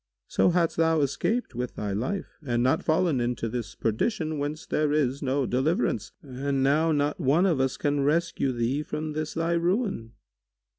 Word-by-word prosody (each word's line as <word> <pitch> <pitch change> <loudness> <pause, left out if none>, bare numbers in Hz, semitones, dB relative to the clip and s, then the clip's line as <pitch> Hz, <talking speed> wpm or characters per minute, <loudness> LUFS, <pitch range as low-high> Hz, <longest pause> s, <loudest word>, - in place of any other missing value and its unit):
So - - +3
hadst 170 -2 +1
thou 160 -1 +3
escaped 205 - -1
with 125 +1 -4
thy 105 -2 -3
life 130 - -3
and 120 -3 0
not 130 +8 +2
fallen 155 -4 +2
into 120 -1 -1
this 115 -1 -5
perdition, 155 - -1
whence 145 +2 -3
there 150 -1 0
is 140 -2 +1
no 135 0 0
deliverance; 135 +8 0
and 135 0 -2
now 155 +4 +3
not 145 +1 0
one 155 +4 +3
of 170 -8 +2
us 130 0 0
can 145 -1 0
rescue 150 -2 +1
thee 125 +4 -1
from 150 0 -4
this 155 0 -4
thy 165 +1 0
ruin." 170 - 0
145 Hz, 170 wpm, -27 LUFS, 130-165 Hz, -, So